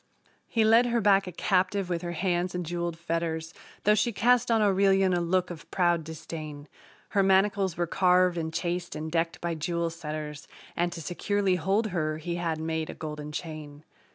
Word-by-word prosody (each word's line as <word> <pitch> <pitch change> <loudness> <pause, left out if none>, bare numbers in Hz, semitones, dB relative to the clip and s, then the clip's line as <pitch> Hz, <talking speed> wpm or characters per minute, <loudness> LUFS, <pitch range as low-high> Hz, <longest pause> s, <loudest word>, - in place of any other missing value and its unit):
He 225 - +2
led 230 +3 +6
her 235 0 +1
back 195 -2 +4
a - - -4
captive 185 +2 +1
with 175 -2 -2
her 175 -1 -4
hands 175 +1 -1
in 180 - -2
jeweled 170 0 -3
fetters, 165 -1 -3 0.3
Though 210 - +5
she 215 +3 +2
cast 240 +4 +3
on 225 -1 +4
Aurelian 195 -2 +3
a 175 - +1
look 180 +1 +1
of 165 -3 -10
proud 175 -3 +2
disdain; 155 -2 -7 0.4
Her 200 - +2
manacles 195 -1 +2
were 175 - +1
carved 180 0 +3
and 160 -1 -3
chased 175 +1 -3
and 155 +1 -5
decked 165 0 0
by 170 -1 -1
jewel 170 +1 -2
setters, 150 -2 -6 0.3
And 175 0 0
to 165 - -6
securely 195 +4 0
hold 200 +6 +1
her 155 -3 -1
he 170 +2 -4
had 165 -2 -2
made 160 0 -2
a - - -6
golden 150 -1 -6
chain. 150 -2 -7
175 Hz, 185 wpm, -28 LUFS, 160-195 Hz, 0.4 s, led